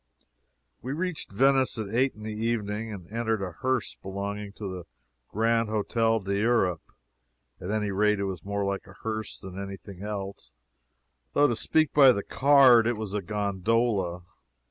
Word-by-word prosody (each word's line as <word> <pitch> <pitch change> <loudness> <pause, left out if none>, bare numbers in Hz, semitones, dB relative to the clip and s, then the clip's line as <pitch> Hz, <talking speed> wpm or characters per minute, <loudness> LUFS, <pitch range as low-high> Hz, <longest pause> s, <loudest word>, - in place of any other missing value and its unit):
We 130 +3 -4
reached 175 - -3
Venice 135 +4 +3
at 110 -2 -5
eight 130 +3 +2
in 105 - -11
the 110 0 -4
evening, 110 -1 -2
and 95 -5 -8
entered 110 -2 -1
a 90 - -4
hearse 130 +6 -1
belonging 100 +1 -5
to 105 -1 -6
the 90 -2 -6 0.4
Grand 115 +1 +1
Hotel 115 +1 +1
d'Europe. 100 -3 +1 0.8
At 90 - -6
any 105 -1 -1
rate, 105 +1 +2
it - - -1
was 95 -5 -4
more 100 0 -2
like 100 0 -3
a 95 - -14
hearse 110 -1 -4
than 95 -1 -8
any 100 0 -5
thing 95 +1 -12
else, 100 -8 -6 0.8
though 145 - +4
to 120 - 0
speak 155 +6 +1
by 135 -3 +8
the 100 - -3
card, 130 -5 +6
it 120 -2 0
was 105 -2 -5
a 105 - -1
gondola. 100 -1 0
105 Hz, 165 wpm, -27 LUFS, 100-115 Hz, 0.8 s, by